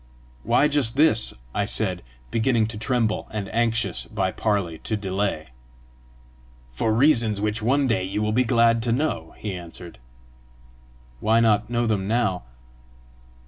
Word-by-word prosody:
"Why 145 Hz, -, +3 dB
just 140 Hz, -5 st, +1 dB
this?" 145 Hz, -8 st, +4 dB, 0.2 s
I 100 Hz, -, 0 dB
said, 95 Hz, -4 st, -1 dB, 0.3 s
beginning 115 Hz, -1 st, +2 dB
to 110 Hz, -, -7 dB
tremble, 115 Hz, -2 st, -1 dB
and 105 Hz, -3 st, -5 dB
anxious 115 Hz, 0 st, 0 dB
by -, -, -2 dB
parley 100 Hz, -7 st, -1 dB
to 110 Hz, -, -3 dB
delay. 95 Hz, -6 st, -2 dB, 1.2 s
"For 110 Hz, -, -1 dB
reasons 115 Hz, -4 st, +3 dB
which 105 Hz, +1 st, -1 dB
one 135 Hz, +5 st, +2 dB
day 115 Hz, -7 st, +1 dB
you 95 Hz, +3 st, -2 dB
will 105 Hz, -, 0 dB
be 125 Hz, +4 st, +2 dB
glad 115 Hz, -1 st, +3 dB
to 115 Hz, 0 st, -1 dB
know," 145 Hz, +7 st, -2 dB
he 105 Hz, -2 st, -5 dB
answered. 85 Hz, -4 st, -9 dB, 1.2 s
"Why 110 Hz, -, +3 dB
not 110 Hz, -1 st, +2 dB
know 120 Hz, 0 st, 0 dB
them 105 Hz, -4 st, -1 dB
now?" 110 Hz, -, 0 dB
110 Hz, 145 wpm, -23 LUFS, 100-120 Hz, 1.2 s, this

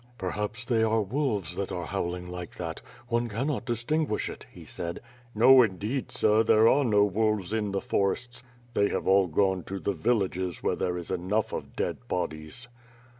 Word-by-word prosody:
"Perhaps 105 Hz, +3 st, -2 dB
they 115 Hz, -3 st, +2 dB
are 110 Hz, 0 st, +2 dB
wolves 105 Hz, -, -1 dB
that 100 Hz, -, -3 dB
are 90 Hz, -2 st, -3 dB
howling 90 Hz, -1 st, -3 dB
like 90 Hz, -1 st, -7 dB
that. 85 Hz, -2 st, -5 dB, 0.3 s
One 120 Hz, 0 st, 0 dB
cannot 125 Hz, +4 st, -2 dB
distinguish 120 Hz, +2 st, -1 dB
it," -, -, -11 dB
he -, -, -12 dB
said. 85 Hz, 0 st, -5 dB, 0.4 s
"No 130 Hz, +4 st, +8 dB
indeed, 110 Hz, +4 st, -1 dB
sir, 110 Hz, 0 st, +3 dB
there 110 Hz, 0 st, +5 dB
are 140 Hz, +4 st, +4 dB
no 105 Hz, -5 st, +4 dB
wolves 105 Hz, -1 st, 0 dB
in 105 Hz, -2 st, 0 dB
the 100 Hz, 0 st, -1 dB
forests. 120 Hz, +5 st, -1 dB, 0.3 s
They 100 Hz, 0 st, +2 dB
have -, -, -2 dB
all 95 Hz, 0 st, +5 dB
gone 95 Hz, +2 st, +1 dB
to 95 Hz, -, -5 dB
the 100 Hz, -, -1 dB
villages 95 Hz, -3 st, -1 dB
where -, -, +1 dB
there 90 Hz, -1 st, -1 dB
is 85 Hz, 0 st, -6 dB
enough 95 Hz, +4 st, -1 dB
of -, -, -6 dB
dead 125 Hz, -, -3 dB
bodies." 80 Hz, +4 st, -4 dB
105 Hz, 175 wpm, -28 LUFS, 90-115 Hz, 0.4 s, No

